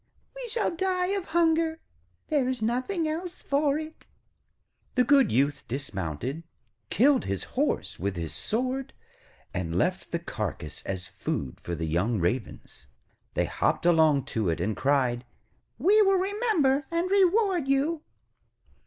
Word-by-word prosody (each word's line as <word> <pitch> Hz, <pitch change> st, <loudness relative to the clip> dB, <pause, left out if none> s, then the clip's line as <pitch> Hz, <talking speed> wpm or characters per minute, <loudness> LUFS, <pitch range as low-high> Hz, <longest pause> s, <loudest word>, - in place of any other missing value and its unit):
We -, -, -6 dB
shall 435 Hz, -6 st, 0 dB
die 365 Hz, 0 st, 0 dB
of 395 Hz, -2 st, -1 dB
hunger, 325 Hz, -1 st, +2 dB, 0.5 s
there 285 Hz, -5 st, +2 dB
is 260 Hz, -1 st, -2 dB
nothing 255 Hz, -, 0 dB
else 340 Hz, +3 st, -4 dB
for 285 Hz, 0 st, +2 dB
it.' 315 Hz, 0 st, -8 dB, 0.9 s
The 250 Hz, -, +5 dB
good 270 Hz, -3 st, +5 dB
Youth 140 Hz, +2 st, +1 dB
dismounted, 120 Hz, -, -4 dB, 0.5 s
killed 265 Hz, +5 st, +4 dB
his 100 Hz, -2 st, -2 dB
horse -, -, -1 dB
with 100 Hz, +2 st, -2 dB
his 85 Hz, -2 st, -4 dB
sword, 255 Hz, +4 st, -2 dB, 0.6 s
and 85 Hz, -2 st, -2 dB
left 180 Hz, -, 0 dB
the 170 Hz, -, +1 dB
carcase 105 Hz, -, -5 dB
as 95 Hz, -1 st, -3 dB
food 65 Hz, -3 st, -4 dB
for 85 Hz, -, -4 dB
the 80 Hz, -, -3 dB
young 95 Hz, +8 st, 0 dB
Ravens. 90 Hz, -, -3 dB, 0.5 s
They -, -, +2 dB
hopped -, -, 0 dB
along 160 Hz, -5 st, +4 dB
to 110 Hz, -5 st, +1 dB
it, 80 Hz, -, -1 dB
and 100 Hz, +5 st, -1 dB
cried: 130 Hz, 0 st, +1 dB, 0.5 s
'We 395 Hz, -, +5 dB
will 390 Hz, -2 st, +4 dB
remember 370 Hz, -, +1 dB
and 340 Hz, +2 st, -1 dB
reward 385 Hz, -4 st, +3 dB
you.' 285 Hz, +4 st, +1 dB
255 Hz, 140 wpm, -27 LUFS, -, 0.9 s, The